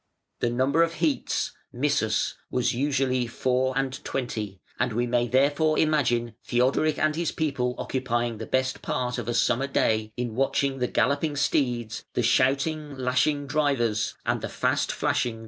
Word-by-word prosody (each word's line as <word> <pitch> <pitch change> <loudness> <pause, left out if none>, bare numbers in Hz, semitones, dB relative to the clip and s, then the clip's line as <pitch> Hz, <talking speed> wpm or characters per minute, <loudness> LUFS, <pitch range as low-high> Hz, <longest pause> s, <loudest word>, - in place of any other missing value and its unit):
The 120 - +1
number 130 +6 +2
of 165 0 +2
heats 155 -3 0 0.2
(missus) 125 -4 0 0.2
was 125 - +1
usually 130 -1 +1
four 130 +2 0
and 135 -1 -2
twenty, 110 -7 -4 0.2
and 115 - 0
we 120 +2 +1
may 120 0 +1
therefore 145 +5 +2
imagine 120 -7 +2
Theodoric 130 +5 +2
and 155 0 +1
his 170 0 -1
people 130 -5 -1
occupying 120 -3 -2
the 110 - -6
best 130 0 0
part 125 0 -2
of 120 - -5
a 120 - -1
summer 120 +3 +2
day 110 -5 +1
in 120 -2 -2
watching 135 +2 0
the 125 - +1
galloping 145 +4 +1
steeds, 120 -5 0
the 125 - +1
shouting, 140 +5 +1
lashing 130 +3 +1
drivers, 135 -7 0
and - - 0
the - - -4
fast - - 0
flashing 120 - 0
chariot - - -9
wheels. - - -11
130 Hz, 165 wpm, -26 LUFS, 120-145 Hz, 0.2 s, number